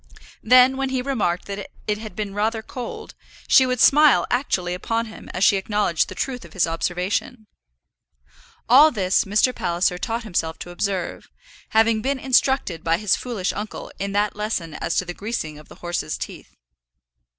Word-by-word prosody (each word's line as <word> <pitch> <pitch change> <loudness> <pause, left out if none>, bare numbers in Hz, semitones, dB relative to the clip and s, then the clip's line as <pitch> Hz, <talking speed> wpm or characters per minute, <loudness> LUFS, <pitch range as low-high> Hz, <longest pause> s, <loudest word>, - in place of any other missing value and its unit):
Then 255 +3 +6
when 270 0 -1
he 260 -1 -1
remarked 215 -10 -1
that 200 0 -6 0.2
it 210 -1 -1
had 220 -1 -9
been 210 -2 -4
rather 220 +2 -1
cold, 245 +1 -7 0.3
she 260 - +6
would 250 -1 -1
smile 295 +1 +6
actually 190 -9 0
upon 225 +5 -2
him 220 - -11
as 180 - -2
she 200 - +5
acknowledged 195 -4 0
the - - -8
truth 255 -2 -3
of - - -14
his 190 - +2
observation. 180 +7 -2 1.2
All 280 +6 +8
this 190 -8 +1
Mr. 215 +6 +2
Palliser 175 -1 0
taught 230 +4 -3
himself 170 -6 -2
to 175 - -8
observe, 185 0 -3 0.4
having 220 0 +3
been 275 +4 -1
instructed 260 - +1
by 165 0 +2
his 205 -1 +2
foolish 225 -7 -3
uncle 210 0 -6
in 200 0 -3
that 205 +1 +1
lesson 205 -6 -3
as - - -3
to 185 - +1
the 175 - -5
greasing 175 -8 -5
of 150 - -16
the - - -13
horses' 175 -3 -2
teeth. - - -9
210 Hz, 175 wpm, -22 LUFS, 180-245 Hz, 1.2 s, All